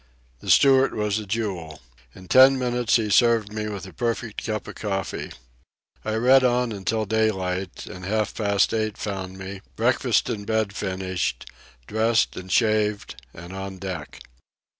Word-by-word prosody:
The - - -8
steward 135 -1 +5
was 105 0 0
a 105 - -8
jewel. 95 -7 -3 0.4
In 95 0 -13
ten 130 +4 +7
minutes 125 -2 +1
he 110 -3 +1
served 115 -2 +3
me 105 0 -3
with 100 -2 -6
a 95 - -11
perfect 115 -2 -3
cup 110 -1 -3
of - - -7
coffee. 95 -2 -3 0.7
I 110 - -2
read 130 +4 +5
on 125 -1 +2
until 110 +2 -1
daylight, 95 -4 -1
and 90 - -9
half 105 +2 -1
past 100 -2 +1
eight 110 -1 -1
found 95 -2 -5
me, 95 0 -7
breakfast - - +2
in 105 - -3
bed 110 -1 0
finished, 95 -2 -3 0.3
dressed 110 - +1
and 95 0 -8
shaved, 105 - +1
and 85 +6 -10
on 95 0 -6
deck. 90 -5 -7
105 Hz, 155 wpm, -24 LUFS, 95-110 Hz, 0.7 s, ten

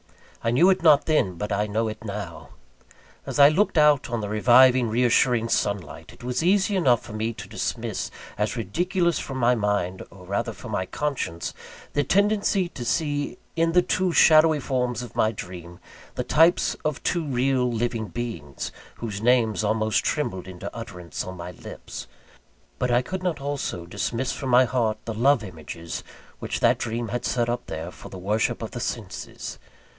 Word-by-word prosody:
I 115 - +1
knew 165 +11 +5
it 185 0 +1
not 155 -4 +6
then; 125 - +2
but 105 +5 -4
I 105 +1 +1
know 110 +2 0
it 110 0 -6
now. 90 -9 -6 0.8
As - - -3
I 140 0 +9
looked 180 +3 +1
out 150 -4 +4
on 120 -2 -2
the 105 - -4
reviving, 120 +3 +5
re 120 +3 +1
assuring 120 -1 +3
sunlight, 85 -9 -2
it - - -16
was 125 +3 -1
easy 195 +3 +3
enough 130 -11 +3
for 110 - -10
me 110 +1 -1
to - - -9
dismiss - - -3 0.3
as 105 +3 0
ridiculous 170 - 0
from 135 - -5
my 125 -1 +4
mind, 105 -5 -1
or 95 -2 -14
rather 100 +2 -1
from - - -9
my 95 - -1
conscience, 130 - -3 0.4
the 145 - +2
tendency 200 +3 +2
to 125 - -7
see 145 +4 -1 0.2
in 165 0 +2
the 180 0 +5
two 185 0 +1
shadowy 155 -1 +6
forms 125 -3 -1
of 120 - -10
my 110 - +3
dream, 90 -4 -8 0.4
the - - -1
types 165 +3 +4
of 150 -3 -2
two 170 - 0
real 130 -2 +1
living 115 -1 -1
beings, 90 - -5 0.2
whose 105 -3 -5
names 115 -4 +3
almost 110 0 +1
trembled 95 - -2
into 90 -1 -8
utterance 90 -7 -6
on 95 0 -7
my 85 +1 -6
lips; 90 - -9 0.7
but 125 - 0
I 120 +1 +3
could 185 +5 -4
not 180 -5 -1
also 140 -11 -3
dismiss 120 +8 -2
from 135 - -4
my 125 +1 +6
heart 115 -3 0
the 115 - -3
love 120 +2 +3
images 85 -2 -7 0.4
which - - -3
that - - +4
dream 115 0 -3
had 120 +4 -3
set 120 -2 0
up 120 0 -3
there 80 +3 -5
for - - -12
the 95 - -9
worship 105 +4 0
of - - -5
the - - -5
senses. - - -5
120 Hz, 180 wpm, -25 LUFS, 105-145 Hz, 0.8 s, I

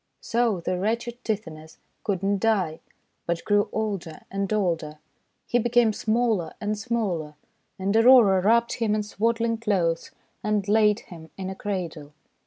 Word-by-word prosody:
So 230 -6 0
the 180 +1 -2
wretched 235 +4 -2
Tithonus 160 -8 -5 0.3
could 195 -3 -2
not 200 0 +1
die, 190 -7 +1 0.5
but 170 -1 -2
grew 205 -1 +2
older 200 -7 -3
and 195 0 -2
older. 170 -7 -1 0.5
He 240 - +1
became 240 -1 +3
smaller 220 -7 0
and 210 -1 -1
smaller, 205 -9 -2 0.4
and 195 +2 -1
Aurora 225 -5 +7
wrapped 235 +4 +3
him 220 -3 0
in 215 - -1
swaddling 230 +2 0
clothes 180 -7 0 0.3
and 210 -2 0
laid 210 0 +3
him 160 -2 -12
in 190 -1 -4
a - - -6
cradle. 170 -8 -5
205 Hz, 145 wpm, -25 LUFS, 180-225 Hz, 0.5 s, Aurora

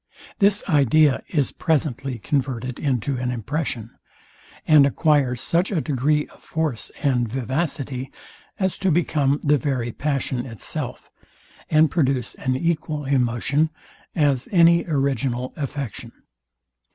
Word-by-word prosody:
This 200 0 +3
idea 150 - +4
is 145 -6 0
presently 135 -4 -1
converted 130 0 -2
into 135 -2 -1
an 125 0 -2
impression, 125 -1 -3 0.7
and 155 -3 +7
acquires 140 -4 +2
such 175 +3 +1
a 185 - +1
degree 150 +1 +1
of - - -20
force 155 -8 -2
and 125 -5 +1
vivacity, 135 0 -2 0.5
as 190 -2 -1
to 190 - +1
become 150 -4 +1
the 145 -1 +3
very 125 -5 -1
passion 135 -2 -2
itself, 115 -5 -6 0.6
and 155 -1 +4
produce 135 -7 0
an 130 -1 -2
equal 155 -1 -1
emotion, 135 +3 +1 0.5
as 140 -5 +1
any 170 -2 +5
original 135 -4 -1
affection. 140 -5 -5
140 Hz, 115 wpm, -23 LUFS, 125-155 Hz, 0.7 s, and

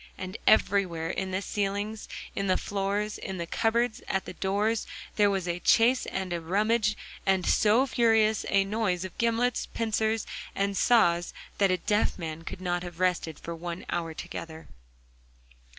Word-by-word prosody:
And 185 +1 -6
everywhere, 180 -6 +3
in 190 0 -3
the 190 +1 -2
ceilings, 205 +2 -2 0.3
in 195 - -1
the 185 - +3
floors, 205 +1 -2
in 190 -1 -5
the 170 - -3
cupboards, 230 +6 0
at 190 - -1
the - - -7
doors, 205 +3 0 0.3
there 205 -1 +4
was 190 -3 -1
a 175 0 -1
chase 240 +7 +4
and 190 -2 -3
a 170 - -2
rummage, 215 +5 +1 0.3
and 190 -2 +2
so 220 +5 +4
furious 225 -4 +3
a 195 0 +4
noise 195 -3 -1
of 185 - -8
gimlets, 235 +1 +1
pincers, 220 -1 0 0.3
and 200 0 0
saws, 175 -7 +3 0.2
that 200 -1 +4
a 185 - +2
deaf 210 +4 +1
man 160 -2 -5
could 180 - -7
not 175 -1 -1
have 175 -1 -8
rested 180 -4 0
for 170 - -6
one 170 +1 -6
hour 165 -2 -2
together. 160 0 -7
195 Hz, 165 wpm, -28 LUFS, 175-215 Hz, 0.3 s, there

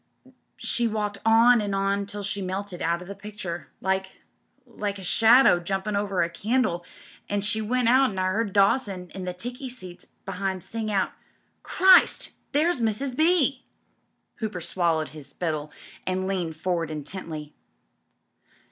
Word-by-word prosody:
She 240 -1 +1
walked 210 -2 -2
on 230 +1 +6
and 200 -1 -2
on 195 0 0
till 205 0 -5
she 200 0 -2
melted 190 0 -4
out 170 +1 0
of - - -13
the 200 - -6
picture 195 -4 -6
— - - -44
like 190 0 -2 0.2
— 270 - -41
like 210 -4 -4
a 190 - -9
shadow 225 +1 +6
jumpin' 195 +4 -2
over 200 -3 +1
a - - 0
candle, 205 -2 0 0.5
an' 205 - 0
as 200 - -1
she 220 +1 +1
went 245 +2 +1
I 260 +3 +5
'eard 190 +3 0
Dawson 195 -2 +1
in 190 -1 -6
the 180 - -3
ticky 245 +7 -5
seats 185 -8 -10 0.2
be'ind 190 -1 -3
sing 220 -1 -4
out: 195 -2 +1 0.3
* - - -43
Christ 375 0 +5
1 - - -25 0.2
There's 305 -1 +2
Mrs. 230 +4 -1
B.l'" 310 -4 +3 0.8
Hooper 215 -5 -4
swallowed 165 -2 0
his 150 -3 -11
spittle 155 -3 -3 0.4
and 185 0 0
leaned 180 -4 -2
forward 170 -1 -1
intently. 155 0 -6
200 Hz, 160 wpm, -26 LUFS, 180-225 Hz, 0.8 s, on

